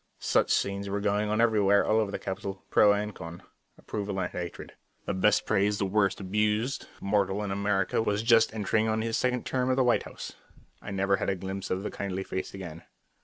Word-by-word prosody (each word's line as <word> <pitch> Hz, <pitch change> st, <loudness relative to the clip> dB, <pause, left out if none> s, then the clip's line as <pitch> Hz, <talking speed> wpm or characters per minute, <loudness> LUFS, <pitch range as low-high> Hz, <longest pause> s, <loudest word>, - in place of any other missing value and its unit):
Such -, -, +1 dB
scenes 100 Hz, 0 st, 0 dB
were 100 Hz, +1 st, -1 dB
going 105 Hz, +1 st, 0 dB
on 105 Hz, +1 st, 0 dB
everywhere 105 Hz, -3 st, +4 dB
all 110 Hz, -, +3 dB
over 110 Hz, -2 st, 0 dB
the -, -, -3 dB
capital, 95 Hz, 0 st, -5 dB
pro 105 Hz, -, +6 dB
and 105 Hz, +1 st, -1 dB
con. 85 Hz, 0 st, -9 dB, 0.3 s
Approval 100 Hz, -2 st, -4 dB
and 90 Hz, -, -2 dB
hatred. 85 Hz, -1 st, -6 dB, 0.3 s
The -, -, -1 dB
best 100 Hz, +3 st, +3 dB
praised, 105 Hz, 0 st, +1 dB
the 100 Hz, -, +1 dB
worst 95 Hz, -1 st, +1 dB
abused 105 Hz, +6 st, 0 dB
mortal 100 Hz, 0 st, 0 dB
in 100 Hz, -, -3 dB
America 100 Hz, 0 st, +1 dB
was 105 Hz, -1 st, 0 dB
just 115 Hz, -1 st, +5 dB
entering 110 Hz, 0 st, 0 dB
on 110 Hz, 0 st, 0 dB
his 115 Hz, 0 st, -1 dB
second 125 Hz, -1 st, 0 dB
term 130 Hz, -1 st, 0 dB
at 130 Hz, -, +3 dB
the 130 Hz, -, +3 dB
White 120 Hz, -1 st, +3 dB
House. -, -, -8 dB, 0.5 s
I -, -, -8 dB
never 100 Hz, 0 st, 0 dB
even -, -, -11 dB
had -, -, -1 dB
a 95 Hz, -, +1 dB
glimpse 95 Hz, +1 st, -5 dB
of 95 Hz, +1 st, -1 dB
the -, -, -3 dB
kindly 95 Hz, -1 st, -3 dB
face 95 Hz, 0 st, -4 dB
again. 85 Hz, -4 st, -8 dB
100 Hz, 215 wpm, -28 LUFS, 95-110 Hz, 0.5 s, pro